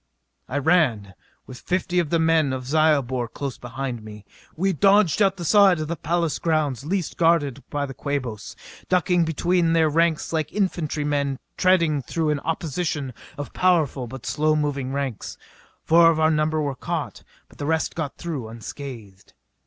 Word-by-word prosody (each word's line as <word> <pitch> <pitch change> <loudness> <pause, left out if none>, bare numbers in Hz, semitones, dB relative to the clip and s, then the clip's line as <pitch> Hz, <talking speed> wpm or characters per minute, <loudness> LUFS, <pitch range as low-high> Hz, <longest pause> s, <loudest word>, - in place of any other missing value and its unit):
I 135 - -2
ran, 130 - +2 0.3
with 125 - -10
fifty 180 0 -1
of 170 -4 0
the 170 - +2
men 160 -4 +2
of 130 -1 -5
Zyobor 140 -4 +2
close 135 +3 -6
behind 120 0 -5
me. 105 -1 -11 0.3
We 190 +4 +1
dodged 200 +1 +4
out 195 -1 +3
the 175 - -5
side 195 -3 +5
of 155 - -3
the 170 - -2
palace 165 0 -1
grounds 150 -6 0
least 180 +2 -2
guarded 155 -5 +2
by 145 -1 -2
the 135 - -7
Quabos, 125 -7 -4 0.3
ducking 180 -1 +2
between 165 +2 +1
their 160 -1 +3
ranks 165 +1 +1
like 155 -2 -1
infantry 170 -7 -1
men 140 -2 -1 0.2
threading 170 -6 +3
through 155 +4 -1
an 150 - -1
opposition 155 -3 -3 0.2
of 145 - -6
powerful 155 -8 +1
but 130 +3 -9
slow 155 +1 +1
moving 140 -3 -1
tanks. 135 -6 -4 0.5
Four 165 +1 +6
of 160 -1 +1
our 160 0 +4
number 155 0 +1
were 145 -2 -1
caught, - - -4 0.2
but - - -21
the 145 - -3
rest 160 0 0
got 155 -4 -4
through 150 -9 -5
unscathed. 115 -3 -9
155 Hz, 170 wpm, -23 LUFS, 135-170 Hz, 0.5 s, Four